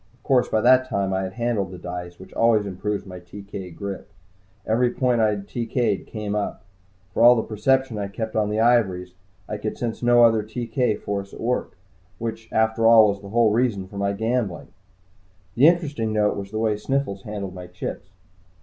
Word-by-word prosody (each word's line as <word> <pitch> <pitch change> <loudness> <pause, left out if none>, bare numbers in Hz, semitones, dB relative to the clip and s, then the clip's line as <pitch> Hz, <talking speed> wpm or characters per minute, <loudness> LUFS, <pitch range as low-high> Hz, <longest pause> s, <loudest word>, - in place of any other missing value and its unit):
Of - - -34
course, 130 -2 +2
by 110 - +1
that 130 +2 +5
time 100 -4 -1
I 95 - 0
had 95 0 -4
handled 115 -5 -1
the 90 - -9
dice, 90 0 -7
which 95 - -13
always 115 -2 +3
improves 100 +2 -3
my 90 -2 -9
TK 95 0 -9
grip. 100 -1 -6 0.6
Every 120 +3 +2
point 125 -1 +1
I 110 - +4
had 100 -1 -4
TK'd 120 -3 -1
came 105 -2 -4
up. 105 -3 -3 0.5
For - - 0
all 120 +1 +8
the 110 - 0
perception 120 +2 0
I 100 - -2
kept 110 +2 -5
on 105 -1 +1
the 105 +1 -1
ivories, 95 -7 +2 0.3
I 105 - -4
could 105 +1 -4
sense 115 -2 -3
no 120 0 +5
other 115 -2 +5
TK 115 +1 -2
force 100 -1 -4
at - - -12
work, 125 -2 -2 0.4
which 115 0 -6
after 110 +1 +2
all 110 -2 +7
was 100 0 -3
the 100 - -10
whole 115 0 +3
reason 110 -4 +1
for 100 - -10
my 100 0 +1
gambling. 110 -3 -2 0.8
The 130 +8 +6
interesting 150 -10 +1
note 105 -1 +2
was 100 -1 -6
the 110 - -5
way 110 -1 +1
Sniffles 105 -2 -2
handled 100 -2 -6
my 90 -1 -9
chips. 90 +1 -7
110 Hz, 195 wpm, -23 LUFS, 100-120 Hz, 0.8 s, all